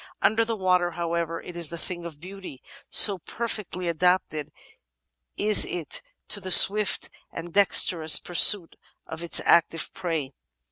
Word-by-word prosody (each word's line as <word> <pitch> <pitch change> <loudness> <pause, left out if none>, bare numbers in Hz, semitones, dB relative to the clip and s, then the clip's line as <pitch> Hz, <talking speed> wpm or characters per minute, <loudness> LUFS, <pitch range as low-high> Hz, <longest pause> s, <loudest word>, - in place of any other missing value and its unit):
Under 220 +2 +1
the 225 0 -5
water, 180 -3 -1
however, 170 -1 -5
it 180 - -12
is 170 -3 -4
a 170 - -8
thing 175 0 -7
of 160 -4 -11
beauty, 185 -5 -13 0.3
so 200 -3 +5
perfectly 205 -3 -7
adapted 170 -3 -2 0.9
is 210 -1 +3
it 165 -5 -4 0.3
to 205 - 0
the 185 - -9
swift 205 +2 +4 0.2
and 170 0 -10
dexterous 175 -5 +4
pur 175 - -11
suit 175 0 +4 0.3
of 160 0 -10
its 170 - 0
active 165 -1 0
prey. 160 -7 -6
175 Hz, 145 wpm, -23 LUFS, 165-195 Hz, 0.9 s, so